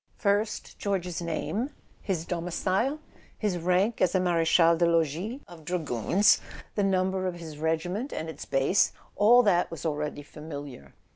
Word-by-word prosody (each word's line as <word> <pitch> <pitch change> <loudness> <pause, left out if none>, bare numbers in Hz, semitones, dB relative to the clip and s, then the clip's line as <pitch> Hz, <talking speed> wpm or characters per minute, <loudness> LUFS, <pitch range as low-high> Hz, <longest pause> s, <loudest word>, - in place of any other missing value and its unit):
First 205 0 -1
George's 180 -4 -2
name, 190 - -2 0.3
his 175 -5 -2
domicile, 185 - -1 0.4
his 200 -5 -1
rank 185 +6 +1
as 185 0 +3
a - - +4
mare 175 -2 +2
chal 165 0 +5
des 170 +1 +2
logis 170 - 0
of 170 -3 -13
dragoons, 165 - +2 0.3
the 205 - 0
number 190 -1 +1
of 180 - -3
his 160 -3 -9
regiment 175 - -1
and 160 - -4
its 160 -3 -7
base: 135 +8 +2 0.2
all 235 +4 +6
that 180 -5 +3
was 165 -1 -8
already 150 -1 -2
familiar. 145 - -9
175 Hz, 150 wpm, -28 LUFS, 160-195 Hz, 0.4 s, all